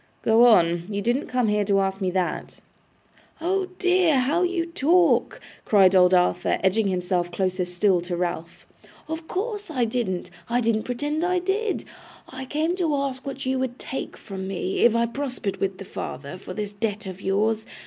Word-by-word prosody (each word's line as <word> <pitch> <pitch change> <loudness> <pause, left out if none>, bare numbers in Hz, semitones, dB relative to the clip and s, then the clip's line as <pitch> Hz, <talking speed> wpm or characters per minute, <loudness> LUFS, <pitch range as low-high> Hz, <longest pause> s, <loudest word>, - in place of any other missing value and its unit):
'Go 230 +2 +6
on. 175 -5 +4
You 200 -1 -2
didn't 240 +7 0
come 250 -2 0
here 210 0 +2
to 200 0 +2
ask 195 0 -1
me 185 - +1
that.' 180 -1 -2 0.8
'Oh 375 +3 0
dear, 365 -4 +3
how 280 +7 +1
you 355 -2 0
talk!' 340 +2 +2 0.2
cried 195 -3 +5
old 180 -1 +6
Arthur, 180 -1 +2
edging 200 +3 +2
himself 180 -1 -1
closer 185 0 -1
still 180 +1 +1
to 175 0 -4
Ralph. 170 -1 -4 0.4
'Of 320 +1 -5
course 415 0 -3
I 255 -6 0
didn't, 220 -7 -2 0.2
I 240 +1 +2
don't 225 -2 +1
pretend 290 +7 -2
I 360 +1 +1
did! 390 +4 -1 0.4
I 265 0 -7
came 310 +6 -1
to 325 -5 +1
ask 275 -1 -3
what 275 -1 -5
you 260 0 0
would 260 -1 -3
take 265 - -6
from 190 -2 -7
me, 190 0 -3
if 235 -1 +5
I 235 0 +3
prospered 250 -5 -3
with 195 -1 -2
the 195 - -8
father, 145 0 -7
for 185 -1 -8
this 205 -1 -4
debt 210 0 -3
of 190 0 -7
yours. 215 +3 0
225 Hz, 180 wpm, -24 LUFS, 190-290 Hz, 0.8 s, Go